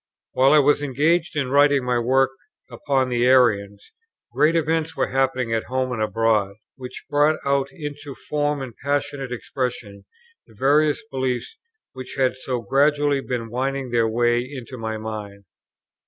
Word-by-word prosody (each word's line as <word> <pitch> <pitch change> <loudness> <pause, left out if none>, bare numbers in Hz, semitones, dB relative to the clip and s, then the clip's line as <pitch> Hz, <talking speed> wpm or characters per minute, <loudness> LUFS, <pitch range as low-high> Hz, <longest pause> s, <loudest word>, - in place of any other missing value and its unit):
While 135 +1 +4
I - - +7
was 145 0 +4
engaged 155 +5 +1
in 135 -3 -1
writing 140 -2 +4
my 125 -1 +1
work 130 +3 +2 0.4
upon 130 +1 0
the 120 0 +1
Arians, 105 -6 +2 0.4
great 155 +3 +3
events 160 0 0
were - - 0
happening 130 -3 0
at 115 - -1
home 130 0 -2
and 115 -3 -3
abroad, 110 -2 +1 0.2
which 125 -1 -9
brought 150 +2 +2
out 140 0 +1
into 145 -2 -8
form 145 -1 -2
and 125 -3 -8
passionate 140 -2 -2
expression 125 -5 -5 0.4
the - - -20
various 145 +4 +2
beliefs 130 - -2 0.4
which 130 -1 -8
had 130 -1 +2
so 130 -1 -4
gradually 145 +1 +2
been 120 -4 -4
winning 135 +1 -2
their 115 -1 +2
way 120 +1 +2
into 130 -1 -8
my 110 -2 -4
mind. 105 -2 -7
130 Hz, 155 wpm, -22 LUFS, 120-145 Hz, 0.4 s, I